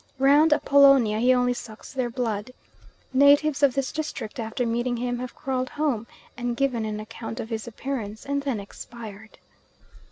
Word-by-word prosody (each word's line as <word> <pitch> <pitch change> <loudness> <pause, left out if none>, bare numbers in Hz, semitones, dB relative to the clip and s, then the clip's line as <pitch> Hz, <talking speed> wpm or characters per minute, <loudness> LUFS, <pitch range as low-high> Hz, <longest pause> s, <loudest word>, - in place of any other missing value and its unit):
Round 285 +4 +5
Apollonia 275 -7 +5
he 250 +2 +4
only 250 -1 +3
sucks 225 -1 -10
their 255 -3 -1
blood. 230 -2 -3 0.6
Natives 285 +2 +5
of 280 -3 +4
this 275 -2 -1
district 270 -8 -5
after 230 +2 -2
meeting 240 +1 -1
him 245 0 -2
have 250 -1 -6
crawled 255 -1 -2
home 275 -7 -1 0.3
and 240 -1 -3
given 250 -5 0
an 215 -1 -3
account 225 +2 -7
of 225 - -5
his 220 +1 -4
appearance, 225 -3 -5
and 280 0 -1
then 270 -6 -2
expired. 220 +1 -10
245 Hz, 160 wpm, -25 LUFS, 225-275 Hz, 0.6 s, Round